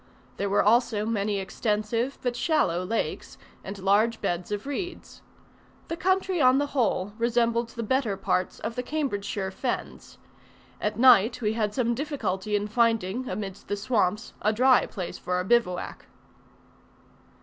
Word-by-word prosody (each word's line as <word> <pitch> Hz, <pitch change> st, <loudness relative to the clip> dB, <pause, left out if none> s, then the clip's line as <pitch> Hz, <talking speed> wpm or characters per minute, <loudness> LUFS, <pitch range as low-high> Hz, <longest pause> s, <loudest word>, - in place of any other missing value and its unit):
There 200 Hz, -, -1 dB
were 200 Hz, -, +3 dB
also 225 Hz, -1 st, +3 dB
many 210 Hz, -2 st, 0 dB
extensive 215 Hz, +5 st, -1 dB
but 245 Hz, -1 st, -1 dB
shallow 245 Hz, -, +1 dB
lakes, 225 Hz, +5 st, -3 dB, 0.3 s
and 195 Hz, +1 st, -6 dB
large 205 Hz, +4 st, +2 dB
beds 175 Hz, +2 st, -2 dB
of 205 Hz, +2 st, -3 dB
reeds. 350 Hz, +6 st, -6 dB, 0.7 s
The 330 Hz, -, -2 dB
country 375 Hz, -1 st, +1 dB
on 255 Hz, 0 st, +6 dB
the 290 Hz, -, +2 dB
whole 205 Hz, -6 st, 0 dB
resembled 235 Hz, 0 st, +1 dB
the 230 Hz, 0 st, -5 dB
better 225 Hz, -3 st, 0 dB
parts 185 Hz, 0 st, -1 dB
of -, -, -3 dB
the 250 Hz, -, -2 dB
Cambridgeshire 205 Hz, -9 st, -2 dB
fens. 245 Hz, +6 st, -5 dB, 0.6 s
At 210 Hz, 0 st, -1 dB
night 235 Hz, -2 st, +6 dB
we 215 Hz, -2 st, 0 dB
had 215 Hz, -2 st, -1 dB
some 235 Hz, -2 st, +1 dB
difficulty 215 Hz, -8 st, -2 dB
in 205 Hz, 0 st, 0 dB
finding 225 Hz, +1 st, +1 dB
amidst 195 Hz, 0 st, -6 dB
the 205 Hz, -, -2 dB
swamps, 210 Hz, -1 st, 0 dB
a 215 Hz, -, +3 dB
dry 255 Hz, +4 st, +4 dB
place 185 Hz, -4 st, -6 dB
for 180 Hz, -, -2 dB
our 180 Hz, -, 0 dB
bivouac. 190 Hz, -4 st, 0 dB
225 Hz, 150 wpm, -26 LUFS, 200-250 Hz, 0.7 s, on